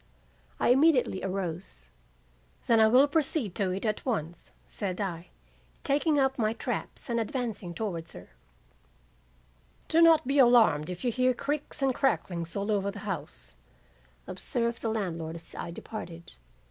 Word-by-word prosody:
"I - - +2
immediately 260 -7 +4
arose. 180 - -5 0.7
'Then 230 -1 +4
I 220 - +7
will 255 +6 +6
proceed 285 - 0
to 195 -2 0
it 190 +4 -3
at 215 -1 -1
once,' 175 - -3 0.2
said 190 -3 -4
I, 180 -4 -4 0.6
taking 295 +2 +2
up 265 -1 +1
my 215 -1 +1
traps - - -5
and 235 -2 0
advancing 225 - -3
towards 170 -6 -4
her. - - -12 1.6
"'Do 330 +1 +3
not 330 -3 +6
be 275 +2 +1
alarmed 225 - +5
if 180 +7 -6
you 245 - +2
hear 255 +1 +2
creaks 290 +1 -3
and 265 -1 +3
cracklings 175 - -1
all 200 +2 -1
over 200 -1 +1
the 200 - -7
house,' - - -6 0.7
observed 235 -1 -2
the 225 - -1
landlord 170 -7 -3
as 165 0 -10
I - - -5
departed. 170 -2 -8
215 Hz, 145 wpm, -28 LUFS, 175-255 Hz, 1.6 s, I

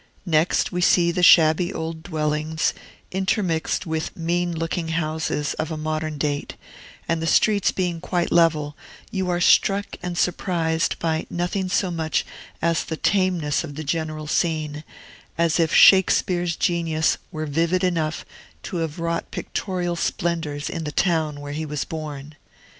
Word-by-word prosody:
Next 160 -1 +2
we 180 - -2
see 170 0 +4
the 180 - -1
shabby 170 +1 +6
old 160 -3 -5
dwellings, 155 0 -1 0.4
intermixed 185 -2 0
with 160 -1 -3
mean 175 +1 0
looking 165 0 -3
houses 155 -2 -1
of 155 0 -2
modern 155 0 -3
date; 145 0 -2 0.5
and 165 -1 0
the 165 - -1
streets 205 +3 +3
being 175 -3 -2
quite 180 -1 -1
level, 155 -3 +3 0.4
you 190 -2 -2
are 175 0 0
struck 200 +2 +3
and 175 -1 -4
surprised 165 -2 0
by 160 -1 -1
nothing 180 +2 -2
so 185 -1 +1
much 160 -2 -1 0.4
as 165 -1 +2
the 160 - -5
tameness 180 -8 +1
of 145 -3 -8
the 155 - -5
general 155 0 -3
scene, 155 -1 -1 0.5
as 170 0 +2
if 165 -1 +2
Shakespeare's 175 -2 +5
genius 165 -2 +1
were 155 -3 -4
vivid 165 +5 0
enough 165 -4 -1 0.4
to 180 - -4
have 160 -2 -3
wrought 170 0 -2
pictorial 180 -3 -3
splendors 165 -4 -2
in 165 - -4
the 150 - -4
town 155 -3 0
where 145 0 -6
he 155 +2 -3
was 150 -1 -3
born. 150 -2 -7
165 Hz, 145 wpm, -23 LUFS, 155-175 Hz, 0.5 s, shabby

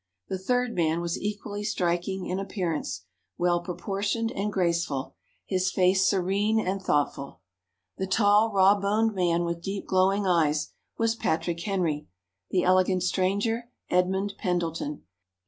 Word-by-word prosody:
The 190 - -2
third 245 +4 0
man 165 -1 +1
was 170 0 -3
equally 205 0 -4
striking 180 -1 -1
in 185 +1 -2
appearance, 170 - -3 0.3
well 175 0 +2
proportioned 200 +5 -2
and 205 +2 -2
graceful, 170 -7 -1 0.3
his 185 -1 0
face 185 0 +3
serene 200 +3 +2
and 195 -2 -1
thoughtful. 140 - -1 0.6
The 190 - -1
tall 205 +2 +4
raw 195 0 +6
boned 215 +3 +1
man 175 -2 +1
with 170 0 -3
deep 195 +3 -4
glowing 190 +2 +2
eyes, 155 -5 +2 0.3
was 225 0 +2
Patrick 170 -5 -1
Henry; 170 - -1 0.4
the 180 - +1
elegant 185 0 +3
stranger, 205 +6 0 0.2
Edmund 190 +3 +1
Pendleton. 165 -6 -2
185 Hz, 130 wpm, -27 LUFS, 170-205 Hz, 0.6 s, raw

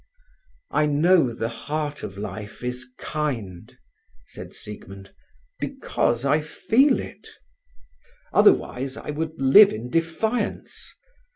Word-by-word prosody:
"I 150 - +2
know 150 -1 +4
the 115 0 -3
heart 145 +6 -4
of 95 - -7
life 105 +2 -7
is 125 +1 -4
kind," 115 - -4 0.5
said - - -10
Siegmund, 100 -2 -9 0.5
"because 140 - -1
I 150 +3 +3
feel 245 - +2
it. - - -9 1.1
Otherwise 135 - +3
I - - -5
would 160 +2 -4
live 165 +10 +8
in 115 +3 -6
defiance. 165 +9 -2
145 Hz, 105 wpm, -24 LUFS, 115-160 Hz, 1.1 s, live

